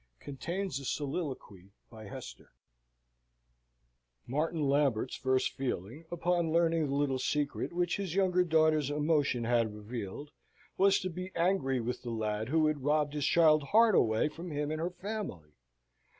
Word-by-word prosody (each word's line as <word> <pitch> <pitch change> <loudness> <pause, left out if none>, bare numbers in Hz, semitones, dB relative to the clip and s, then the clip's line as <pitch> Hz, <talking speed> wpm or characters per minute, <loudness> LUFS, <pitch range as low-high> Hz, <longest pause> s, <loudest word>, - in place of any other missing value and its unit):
Contains 170 +4 -4
a 140 - -9
Soliloquy 130 - -4 0.2
by 110 -2 -11
Hester 100 - -10 1.7
Martin 150 +3 -1
Lambert's 140 -5 +1
first 130 -1 +1
feeling, 130 - -4
upon 175 -1 0
learning 165 -2 +2
the 140 - -2
little 140 -2 0
secret 145 +4 -1
which 175 +1 0
his 190 -4 -4
younger 185 -2 +3
daughter's 155 -3 +3
emotion 145 -4 +1
had 115 -2 +1
revealed, 110 +6 -7 0.4
was 195 0 +4
to 185 - -2
be 180 +2 -6
angry 165 -7 +1
with 120 +2 -3
the 120 - -6
lad 110 0 -2
who 160 +1 +3
had 150 -3 0
robbed 150 0 +1
his 145 -2 0
child's 155 -3 +4
heart 225 +5 +5
away 110 -2 +3
from 165 +4 -8
him 150 -1 -2
and 155 0 -3
her 170 - 0
family. 180 - -6
150 Hz, 150 wpm, -31 LUFS, 130-170 Hz, 1.7 s, heart